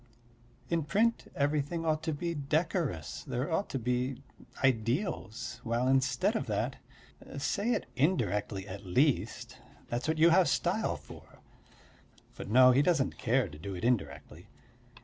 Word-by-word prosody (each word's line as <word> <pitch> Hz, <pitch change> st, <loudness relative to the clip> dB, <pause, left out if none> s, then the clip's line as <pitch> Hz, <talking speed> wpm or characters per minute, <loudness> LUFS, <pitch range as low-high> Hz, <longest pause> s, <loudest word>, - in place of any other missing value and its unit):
In 170 Hz, -1 st, +2 dB
print 210 Hz, +10 st, 0 dB
everything 145 Hz, +3 st, 0 dB
ought 155 Hz, -1 st, +1 dB
to 160 Hz, -, -2 dB
be 170 Hz, +3 st, -3 dB
decorous; 150 Hz, -, -1 dB
there 130 Hz, +6 st, -3 dB
ought 180 Hz, +5 st, 0 dB
to -, -, -2 dB
be 125 Hz, +2 st, -2 dB, 0.4 s
ideals, 120 Hz, -, -1 dB
while 120 Hz, +2 st, 0 dB
instead 130 Hz, 0 st, +2 dB
of -, -, -2 dB
that.... -, -, -1 dB, 0.6 s
Say 200 Hz, -, 0 dB
it -, -, -2 dB
indirectly, 105 Hz, -, 0 dB
at 100 Hz, +1 st, -8 dB
least; 120 Hz, -, 0 dB, 0.3 s
that's 120 Hz, +4 st, -2 dB
what 160 Hz, 0 st, 0 dB
you 165 Hz, +2 st, +6 dB
have 185 Hz, +1 st, +5 dB
style -, -, 0 dB
for. -, -, -14 dB, 1.0 s
But -, -, -7 dB
no, 130 Hz, +3 st, +7 dB
he 130 Hz, +3 st, +4 dB
doesn't 145 Hz, -3 st, +1 dB
care 125 Hz, 0 st, +2 dB
to 75 Hz, -3 st, -12 dB
do 95 Hz, +4 st, -6 dB
it 90 Hz, -, -7 dB
indirectly. 80 Hz, -, -2 dB
130 Hz, 145 wpm, -31 LUFS, 115-160 Hz, 1.0 s, no